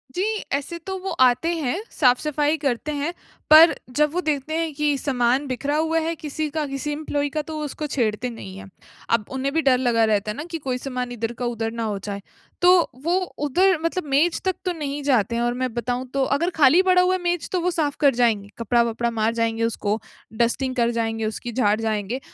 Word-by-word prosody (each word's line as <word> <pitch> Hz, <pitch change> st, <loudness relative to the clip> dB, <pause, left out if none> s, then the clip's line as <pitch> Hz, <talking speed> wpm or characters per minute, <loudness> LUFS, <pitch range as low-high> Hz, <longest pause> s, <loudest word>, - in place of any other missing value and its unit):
जी, 365 Hz, -, 0 dB, 0.3 s
ऐसे 285 Hz, +5 st, -2 dB
तो 380 Hz, -, -3 dB
वो 385 Hz, -, -5 dB, 0.2 s
आते 255 Hz, +8 st, +2 dB
हैं, 270 Hz, -6 st, -1 dB, 0.2 s
साफ़-सफ़ाई 295 Hz, +3 st, +2 dB
करते 280 Hz, 0 st, -2 dB
हैं, 295 Hz, +3 st, -2 dB, 0.4 s
पर 320 Hz, +2 st, +9 dB, 0.2 s
जब 300 Hz, 0 st, +3 dB
वो 360 Hz, -, 0 dB
देखते 305 Hz, -2 st, -2 dB
हैं 330 Hz, -2 st, -2 dB
कि 295 Hz, 0 st, 0 dB
सामान 260 Hz, 0 st, +1 dB
बिखरा 280 Hz, +3 st, -2 dB
हुआ 320 Hz, +1 st, +1 dB
है 325 Hz, +1 st, -1 dB
किसी 305 Hz, 0 st, -4 dB
का, 305 Hz, +1 st, -2 dB
किसी 275 Hz, +2 st, -4 dB
एम्प्लॉयी 290 Hz, -1 st, -2 dB
का, 305 Hz, +2 st, -2 dB
तो 310 Hz, +1 st, -8 dB
वो 305 Hz, -, -3 dB
उसको 300 Hz, +1 st, -5 dB
छेड़ते 240 Hz, -2 st, -1 dB
नहीं 195 Hz, -5 st, -9 dB
हैं। 195 Hz, 0 st, -10 dB, 0.4 s
अब 230 Hz, -3 st, +2 dB
उन्हें 265 Hz, +1 st, -2 dB
भी 325 Hz, -, +2 dB
डर 265 Hz, -3 st, +4 dB
लगा 235 Hz, -3 st, +2 dB
रहता 210 Hz, -1 st, 0 dB
है -, -, -8 dB
ना 295 Hz, -, -4 dB
कि 330 Hz, -, -2 dB
कोई 265 Hz, -5 st, -3 dB
सामान 250 Hz, -1 st, -4 dB
इधर 230 Hz, -1 st, -3 dB
का -, -, 0 dB
उधर 225 Hz, -2 st, -2 dB
ना 230 Hz, 0 st, -4 dB
हो 210 Hz, -2 st, -2 dB
जाए। 200 Hz, -1 st, -5 dB, 0.4 s
तो 360 Hz, -, +7 dB, 0.3 s
वो 340 Hz, +3 st, +1 dB, 0.3 s
उधर 370 Hz, +6 st, +3 dB
मतलब 335 Hz, +2 st, -1 dB
मेज 295 Hz, +5 st, +2 dB
तक 375 Hz, -1 st, +1 dB
तो 365 Hz, -, +1 dB
नहीं 290 Hz, -3 st, -4 dB
जाते 240 Hz, -5 st, +2 dB
हैं 235 Hz, -, 0 dB
और 240 Hz, 0 st, +1 dB
मैं 255 Hz, -2 st, -1 dB
बताऊँ 245 Hz, +2 st, -2 dB
तो 275 Hz, -1 st, +1 dB
अगर 340 Hz, +5 st, 0 dB
खाली 315 Hz, +4 st, +6 dB
पड़ा 370 Hz, -1 st, +4 dB
हुआ 365 Hz, +1 st, +2 dB
है 370 Hz, -, -4 dB
मेज, 350 Hz, -2 st, -1 dB
तो 365 Hz, -, 0 dB
वो 360 Hz, -, +1 dB
साफ़ 300 Hz, -4 st, -1 dB
कर 280 Hz, -2 st, +4 dB
जाएँगे, 220 Hz, -5 st, +1 dB
कपड़ा-वपड़ा 235 Hz, 0 st, +1 dB
मार 225 Hz, 0 st, 0 dB
जाएँगे 230 Hz, 0 st, 0 dB
उसको, 220 Hz, -1 st, -1 dB, 0.3 s
डस्टिंग 240 Hz, +3 st, 0 dB
कर 235 Hz, -1 st, +2 dB
जाएँगे 225 Hz, -1 st, -1 dB
उसकी, 220 Hz, +2 st, -4 dB
झाड़ 215 Hz, -3 st, +2 dB
जाएँगे। 220 Hz, +2 st, -2 dB
270 Hz, 220 wpm, -23 LUFS, 235-310 Hz, 0.4 s, पर